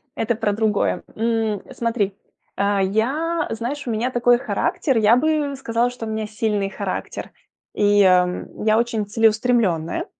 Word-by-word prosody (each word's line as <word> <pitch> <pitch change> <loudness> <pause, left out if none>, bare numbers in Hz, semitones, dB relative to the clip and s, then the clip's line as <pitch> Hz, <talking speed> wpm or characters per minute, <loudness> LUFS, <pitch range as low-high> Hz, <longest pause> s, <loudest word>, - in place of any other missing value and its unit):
Это 225 +1 0
про 215 -2 0
другое. 215 -1 0
М, 225 -2 0
э, - - -12
смотри, 225 -4 -1 0.4
э, 200 0 +1
я, 275 - 0
знаешь, 245 +5 -4
у - - -1
меня 230 +4 -1
такой 245 0 +4
характер, 270 - -1
я 220 +2 +5
бы 295 0 0
сказала, 235 -2 0
что 245 -2 -7
у - - -5
меня 220 -1 -3
сильный 210 -2 -1
характер. - - -5 0.4
И, 205 -1 +4
ам, 180 +1 +1
я 215 0 +4
очень 230 -3 0
целеустремленная. 220 -6 +1
225 Hz, 155 wpm, -21 LUFS, 205-245 Hz, 0.4 s, я